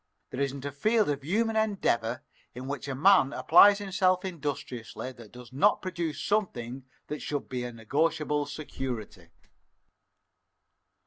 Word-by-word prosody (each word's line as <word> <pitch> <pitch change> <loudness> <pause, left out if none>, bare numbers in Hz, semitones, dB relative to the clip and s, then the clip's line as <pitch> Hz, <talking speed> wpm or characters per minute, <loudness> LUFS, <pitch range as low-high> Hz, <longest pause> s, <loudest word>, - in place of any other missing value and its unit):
There 130 - -5
isn't 140 0 -2
a 140 - -3
field 210 - +2
of 140 -1 -4
human 220 +8 0
endeavor 125 - 0 0.3
in 130 +1 -7
which 140 -1 -4
a 135 - -3
man 160 -2 +5
applies 205 0 +7
himself 190 -2 +1
industriously 140 -8 -5
that 115 -4 -14
does 125 0 -13
not 200 +10 +3
produce 170 -4 -3
something 135 - -2 0.2
that 150 - -5
should 145 -2 -3
be 125 -1 -4
a 120 - -5
negotiable 150 +5 0
security." 125 - -6
145 Hz, 135 wpm, -28 LUFS, 125-185 Hz, 0.3 s, applies